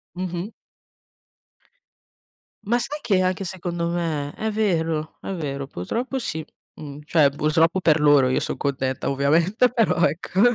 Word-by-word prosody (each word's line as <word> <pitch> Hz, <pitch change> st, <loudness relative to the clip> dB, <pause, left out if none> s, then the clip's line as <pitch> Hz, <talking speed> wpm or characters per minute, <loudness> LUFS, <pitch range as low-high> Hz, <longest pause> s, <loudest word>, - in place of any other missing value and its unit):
Mh-mh. 180 Hz, +1 st, -4 dB, 2.1 s
Ma 235 Hz, +4 st, +1 dB
sai 295 Hz, +5 st, -4 dB
che 190 Hz, -4 st, +2 dB
anche 185 Hz, +1 st, 0 dB
secondo 175 Hz, -2 st, -3 dB
me. 160 Hz, -4 st, -2 dB
È 220 Hz, 0 st, -2 dB
vero, 165 Hz, -7 st, -1 dB
è -, -, -5 dB
vero, 140 Hz, -5 st, -4 dB
purtroppo 235 Hz, -, -3 dB
sì. 160 Hz, -10 st, -4 dB, 0.3 s
Mhmm, 145 Hz, -1 st, -9 dB
cioè 150 Hz, -2 st, +4 dB
purtroppo 160 Hz, +5 st, +2 dB
per 160 Hz, -3 st, +3 dB
loro, 145 Hz, -3 st, +5 dB
io 130 Hz, -, +1 dB
son -, -, -3 dB
contenta 130 Hz, -2 st, -2 dB
ovviamente, 165 Hz, -, +2 dB
però 225 Hz, -8 st, +2 dB
ecco. 180 Hz, +4 st, -1 dB
165 Hz, 135 wpm, -23 LUFS, 145-190 Hz, 2.1 s, loro